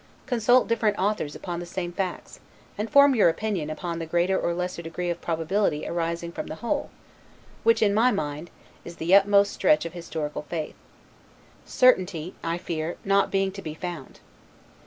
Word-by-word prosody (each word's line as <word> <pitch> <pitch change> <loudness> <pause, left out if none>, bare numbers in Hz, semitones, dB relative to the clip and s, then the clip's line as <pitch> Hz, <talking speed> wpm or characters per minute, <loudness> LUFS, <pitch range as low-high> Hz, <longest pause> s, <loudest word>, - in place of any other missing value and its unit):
Consult 245 +1 +3
different 220 -3 +1
authors 190 -7 -1
upon 175 -2 -5
the 175 - -6
same 175 -1 -4
facts, 185 -1 -5 0.4
and 215 +2 -3
form 280 0 +6
your 215 -8 +5
opinion 185 -4 -2
upon 170 +2 -4
the 165 - -5
greater 175 +3 +1
or 170 - 0
lesser 180 0 -3
degree 175 +1 -3
of 170 - -5
probability 165 0 0
arising 170 0 -2
from - - -6
the 155 - -6
whole, 235 - -2 0.7
which, 460 - +3
in 205 -1 +3
my 225 +4 +4
mind, 155 -6 -3 0.3
is 170 - -9
the 170 +3 -1
utmost 200 0 +5
stretch 155 -4 +3
of 170 - -6
historical 160 -4 -5
faith; 160 -3 -4 0.9
certainty 185 -9 +2
(I 165 +1 -1
fear) 165 -1 -4
not 200 0 +3
being 195 0 0
to 195 +1 -8
be 155 -3 -6
found. 170 -4 -7
175 Hz, 170 wpm, -25 LUFS, 165-200 Hz, 0.9 s, form